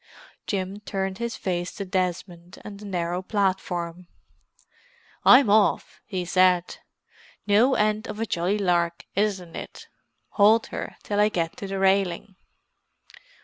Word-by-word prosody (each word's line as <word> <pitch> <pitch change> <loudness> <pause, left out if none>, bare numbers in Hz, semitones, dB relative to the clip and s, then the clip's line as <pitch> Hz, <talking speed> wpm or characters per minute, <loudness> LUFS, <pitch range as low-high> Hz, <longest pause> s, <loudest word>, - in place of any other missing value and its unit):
Jim 195 0 -3
turned 195 -1 -4
his 235 -1 -3
face 175 -1 -3
to 200 - -6
Desmond 180 -1 -3
on 205 -1 -8
the 210 - -11
narrow 175 -2 -2
platform. 185 -3 -2 1.2
"I'm 255 0 +7
off!" 205 0 +2
he 185 -4 -3
said. 180 0 +2 0.7
"No 220 +6 +4
end 215 +1 0
of 210 0 -7
a 225 - 0
jolly 185 +1 -1
lark, 175 -3 0
isn't 195 -4 -1
it? - - -9 0.4
Hold 220 +2 +4
her - - -5
till 205 0 -2
I 210 +1 +4
get 170 -5 -3
on 200 - -5
the 195 - -3
railing." 190 0 +1
195 Hz, 135 wpm, -25 LUFS, 180-210 Hz, 1.2 s, I'm